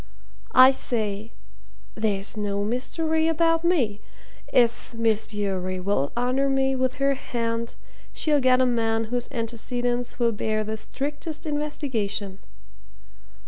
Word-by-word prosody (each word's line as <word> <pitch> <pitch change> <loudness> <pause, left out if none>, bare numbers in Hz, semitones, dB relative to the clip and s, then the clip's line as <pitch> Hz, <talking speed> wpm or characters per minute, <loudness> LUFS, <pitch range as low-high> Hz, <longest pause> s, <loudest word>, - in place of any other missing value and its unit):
I 255 +1 +9
say 220 -4 -2 0.6
there's 205 -2 0
no 200 -1 -1
mystery 315 +8 0
about 330 0 +2
me. 260 - +2 0.5
If 235 -1 +2
Miss 225 -2 +1
Bewery 190 -3 -2
will 180 -7 0
honour 255 +3 +1
me 270 0 +2
with 255 0 0
her 275 0 +2
hand, 230 -3 -3 0.4
she'll 300 -3 +1
get 255 0 +4
a 260 - +4
man 225 -2 +1
whose 245 -1 -1
antecedents 240 0 -2
will 235 -2 +2
bear 215 0 -1
the 215 +1 -4
strictest 295 +7 -5
investigation." 245 -10 -2
240 Hz, 120 wpm, -25 LUFS, 215-270 Hz, 0.6 s, I